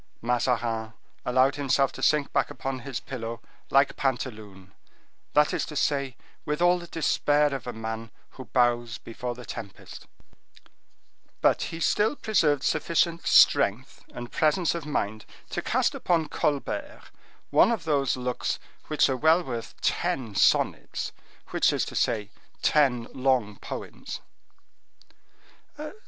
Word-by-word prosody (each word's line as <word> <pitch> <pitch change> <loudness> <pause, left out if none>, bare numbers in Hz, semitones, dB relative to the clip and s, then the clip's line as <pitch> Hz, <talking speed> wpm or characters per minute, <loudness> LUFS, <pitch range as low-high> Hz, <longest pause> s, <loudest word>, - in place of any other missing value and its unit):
Mazarin 115 -2 0 0.3
allowed 130 +2 +3
himself 135 -1 +2
to - - -10
sink 150 -2 +2
back - - +2
upon 135 -1 -4
his 130 -1 -5
pillow 115 -3 -6 0.3
like 135 0 +4
Pantaloon; 110 -8 -4 0.6
that 150 0 +4
is - - 0
to 150 - -9
say, 140 -3 0 0.3
with 150 -1 -2
all 175 +1 +4
the 175 - -9
despair 150 -3 +2
of 130 -2 -5
a - - -2
man 110 0 -5 0.2
who 130 - -10
bows 120 0 +1
before 120 +1 -6
the 125 0 -10
tempest; 105 -4 -9 1.3
but - - +3
he 165 - -6
still 210 - +2
preserved 155 - +2
sufficient 170 +2 +1
strength - - +4
and 120 0 -8
presence 160 +2 +2
of 165 -3 -5
mind 110 -7 -2 0.3
to - - -2
cast - - +1
upon 165 -3 +1
Colbert 290 - -2 0.4
one - - +6
of 220 -9 -1
those 140 -5 +1
looks 125 -1 -2 0.3
which 155 - +3
are 135 - 0
well 160 +6 +4
worth 120 -6 -6
ten 120 -6 -1
sonnets, - - +1 0.4
which - - +3
is - - 0
to - - -8
say, 105 -2 0 0.3
ten 130 -6 +3
long 125 -6 +1
poems. - - -7
135 Hz, 135 wpm, -27 LUFS, 120-150 Hz, 1.3 s, one